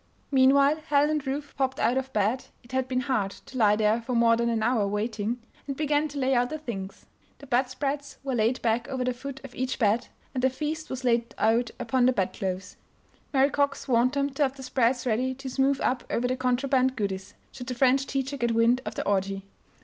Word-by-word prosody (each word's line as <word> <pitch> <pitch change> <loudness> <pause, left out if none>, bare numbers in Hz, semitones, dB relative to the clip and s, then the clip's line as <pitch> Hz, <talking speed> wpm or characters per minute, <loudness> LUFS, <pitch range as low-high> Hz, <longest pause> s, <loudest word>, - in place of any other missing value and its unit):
Meanwhile 275 +2 +5
Helen 290 0 +3
and 300 -3 -2
Ruth 285 +2 -3
popped 265 -1 -1
out 240 - +2
of 265 0 -2
bed 215 +4 0 0.2
(it 240 - -17
had 260 0 0
been 255 -1 0
hard 255 -7 0 0.2
to - - -13
lie 210 -2 +5
there 215 +2 +2
for 245 +2 -3
more 230 0 +5
than 235 0 0
an 225 -2 0
hour, 225 -3 +2
waiting) 210 +3 -2 0.3
and 275 -1 -4
began 300 0 +1
to 290 -1 -8
lay 265 -1 +1
out 245 0 +2
the 310 - -3
things. 200 -10 -7 0.3
The 280 - -12
bedspreads 275 +3 -1
were 270 -1 -2
laid 235 +2 +1
back 230 +1 +1
over 260 -2 -2
the 250 0 0
foot 270 +2 -8
of 270 - -10
each 260 0 -2
bed 220 0 +2 0.3
and 255 - -1
the 260 - +4
feast 310 +4 -4
was 260 0 -5
laid 235 -1 +1
out 225 +2 +2
upon 245 +2 +2
the 255 - +4
bed 190 -6 -1
clothes. 185 -1 -4 0.5
Mary 275 0 +3
Cox 285 0 0
warned 250 +1 +3
them 280 0 0
to 270 - -5
have 270 -2 +2
the 265 - -8
spreads 250 -1 +1
ready 255 +3 0
to 270 0 -7
smooth 270 +1 +2
up 250 -1 0
over 245 +1 0
the 255 - 0
contraband 260 +1 +1
goodies, 195 -4 -4 0.2
should 250 -2 -9
the 250 - -3
French 265 +2 +3
teacher 275 +1 -2
get 235 -3 0
wind 235 +2 +4
of - - -5
the - - -3
orgy. 195 0 0
255 Hz, 225 wpm, -27 LUFS, 230-270 Hz, 0.5 s, Meanwhile